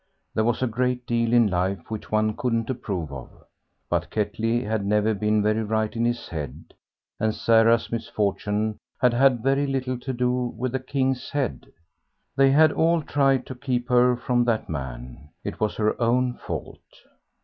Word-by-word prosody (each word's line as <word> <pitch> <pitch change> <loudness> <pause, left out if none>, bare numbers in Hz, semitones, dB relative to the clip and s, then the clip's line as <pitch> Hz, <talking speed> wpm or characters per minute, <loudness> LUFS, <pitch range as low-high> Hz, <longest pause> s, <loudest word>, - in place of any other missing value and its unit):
There 110 - +1
was 120 +2 0
a - - +2
great 125 +2 -1
deal 115 -1 0
in 120 -1 +5
life 95 0 -1
which 110 - -6
one 110 0 +1
couldn't 115 -1 -1
approve 95 - -4
of. 65 -3 -8 0.6
But - - -1
Ketley 115 +3 -1
had 110 -1 -1
never 105 +2 +2
been 105 0 +1
very 110 +1 +1
right 110 0 -1
in 115 +1 0
his 120 0 -1
head, 75 -1 -7 0.5
and 110 0 0
Sarah's 115 0 +3
misfortune 105 -1 -1 0.2
had 125 -2 +3
had 125 -2 +3
very 135 +2 +2
little 130 -2 -2
to 130 +2 -4
do 125 -1 -1
with 125 +1 -2
the 130 - -1
"King's 130 0 -1
Head." 140 -4 -3 0.6
They 135 0 +5
had 155 +2 +5
all 165 +1 +2
tried 135 -3 +2
to - - -7
keep 125 0 -3
her 125 0 +4
from 120 0 +1
that 115 -2 0
man; 65 -1 -7
it - - -5
was 110 -1 0
her 110 +2 0
own 125 +2 +2
fault. - - -6
115 Hz, 170 wpm, -24 LUFS, 105-125 Hz, 0.6 s, in